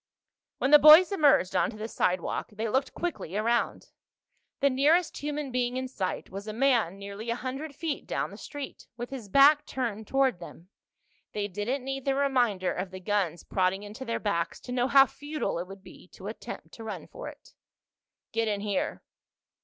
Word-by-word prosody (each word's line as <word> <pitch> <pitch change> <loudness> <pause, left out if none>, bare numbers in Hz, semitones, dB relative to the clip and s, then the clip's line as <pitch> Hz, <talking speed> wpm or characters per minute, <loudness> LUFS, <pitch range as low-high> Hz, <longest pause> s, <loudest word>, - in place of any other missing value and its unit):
When 270 - 0
the 295 - +10
boys 310 +5 +9
emerged 290 - +3
onto 185 +5 +1
the 215 +1 -4
sidewalk 180 -5 -1
they 220 +2 -3
looked 265 +5 -1
quickly 315 - -3
around. 235 +3 0 0.7
The 280 -2 +3
nearest 300 +6 +3
human 295 -1 -3
being 250 0 0
in 260 0 -2
sight 190 -8 -4
was 200 +3 -7
a 215 - -4
man 230 -7 +2
nearly 200 +3 -7
a 235 - +1
hundred 270 +4 -5
feet 315 -1 -4
down - - -2
the - - -9
street, 290 -2 -8
with 240 +2 -6
his 245 -7 -7
back 285 +6 +6
turned 220 -5 -3
toward 270 -7 +2
them. 175 +1 -12 0.6
They 205 -1 -2
didn't 225 +7 -3
need 270 -1 -4
the 275 -1 +1
reminder 245 -9 +1
of 185 +1 -4
the 185 0 -8
guns 185 -3 -1
prodding 190 +1 0
into 210 +5 -8
their 230 -3 -2
backs 170 -5 -1
to 245 - -8
know 250 0 +1
how 270 0 +7
futile 290 - -4
it 175 - -5
would 195 0 -11
be - - -14
to 190 - -12
attempt 220 +3 -7
to 225 - -10
run 220 - -6
for - - -9
it. - - -12 0.8
"Get 225 0 0
in 205 -2 -1
here." 205 -2 -2
235 Hz, 185 wpm, -28 LUFS, 200-275 Hz, 0.8 s, the